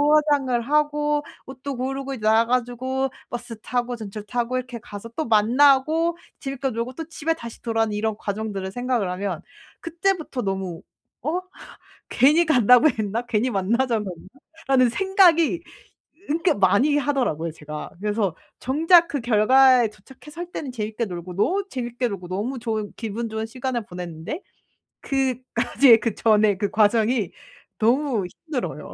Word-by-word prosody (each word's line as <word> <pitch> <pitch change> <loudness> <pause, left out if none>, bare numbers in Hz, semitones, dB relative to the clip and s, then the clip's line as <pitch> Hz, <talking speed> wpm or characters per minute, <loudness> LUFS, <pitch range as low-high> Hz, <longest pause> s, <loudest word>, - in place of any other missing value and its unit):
화장을 285 -5 +2
하고 295 +2 +1 0.2
옷도 265 +1 -6
고르고 270 +2 -3
이제 250 - -8
나와 220 +2 +4
가지고 255 +2 -1 0.2
버스 240 -2 -6
타고 245 0 -2
전철 215 -2 -7
타고 240 +2 -2
이렇게 250 -1 -5
가서 205 +1 -9
또 315 - -2
만나고 275 +9 +4 0.2
재밌게 270 -1 -3
놀고 235 +1 -4
또 325 +5 -6
집에 325 0 -1
다시 235 -8 -10 0.3
이런 210 +1 -1
과정들을 200 -2 -4
생각을 245 -4 -1
하면 180 -2 -3 0.4
그때부터 335 -5 -2
너무 190 -4 -3 0.4
어 315 +6 0 0.7
'괜히 300 +6 +5
간다고 250 -2 +5
했나? 220 0 -2
괜히 240 +1 +1
만나자고 230 +3 0 0.6
했나?'라는 255 -2 +4
생각이 350 -1 +3 0.7
그렇게 330 +4 +2
많이 205 +10 +3
하더라고요 250 - -1
제가. 150 -1 -8
그래서 205 -3 0 0.3
정작 330 +6 +4
그 285 - -2
결과에 245 +1 +5
도착해서 265 - -14
할 350 0 -6
때는 275 -4 -5
재밌게 220 0 -3
놀고 180 -1 -7
너무 380 - +1
재밌게 245 -1 -2
놀고 190 -4 -7
너무 210 +9 -3
좋은 220 -3 -3
기분 225 +1 -4
좋은 220 0 -3
시간을 245 0 -3
보냈는데 180 - -6 0.6
그까지의 255 -2 +3
그 230 - -1
전에 215 -2 +3
그 200 +1 -1
과정이 220 -1 +2 0.5
너무 240 -2 +2 0.2
힘들어요. 275 -5 -4
245 Hz, 320 characters per minute, -23 LUFS, 215-275 Hz, 0.7 s, 괜히